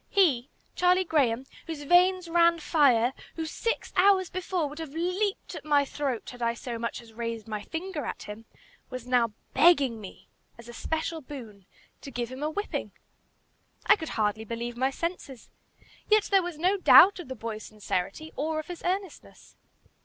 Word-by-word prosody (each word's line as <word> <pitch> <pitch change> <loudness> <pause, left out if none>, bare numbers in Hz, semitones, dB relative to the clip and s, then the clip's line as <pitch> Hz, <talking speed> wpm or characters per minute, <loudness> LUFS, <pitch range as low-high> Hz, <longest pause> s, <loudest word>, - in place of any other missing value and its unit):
He, 290 -10 +3 0.3
Charlie 360 +1 +3
Graham, 265 -7 +1 0.2
whose 315 -3 -5
veins 360 +3 +4
ran 340 0 +4
fire, 265 -7 +3 0.2
who, 325 - -3
six 460 +8 -3
hours 375 -1 +4
before, 365 -3 -2
would 295 +2 -9
have 315 -2 -7
leaped 365 +4 -1
at - - -7
my 290 -2 +3
throat 270 -4 -3
had 245 -1 -12
I 235 0 +1
so 235 -1 -6
much 235 +1 -4
as 225 -1 -17
raised 230 -1 -5
my 215 -1 -4
finger 325 - -5
at - - -5
him, 210 +2 -9 0.4
was 255 -2 -7
now 245 -3 +2 0.2
begging 280 -10 +4
me, 195 - -11 0.3
as 235 0 -13
a 240 - -9
special 320 +5 -3
boon, 225 -9 -10 0.3
to - - -8
give 240 -2 -4
him 260 +2 -8
a 300 - 0
whipping! 410 +7 -4 0.9
I - - +7
could 320 -6 -6
hardly 215 0 0
believe 235 +2 -5
my 260 +2 +1
senses. 280 -4 -5 0.6
Yet 430 -1 +5
there 390 -1 +6
was 350 -3 -5
no 365 +5 +2
doubt 390 +1 +8
of 350 - -8
the 260 - -6
boy's 220 -1 -5
sincerity, 210 - -4
or 310 +2 -2
of 310 - -5
his 350 - -7
earnestness. 375 -1 -5
290 Hz, 175 wpm, -28 LUFS, 235-350 Hz, 0.9 s, doubt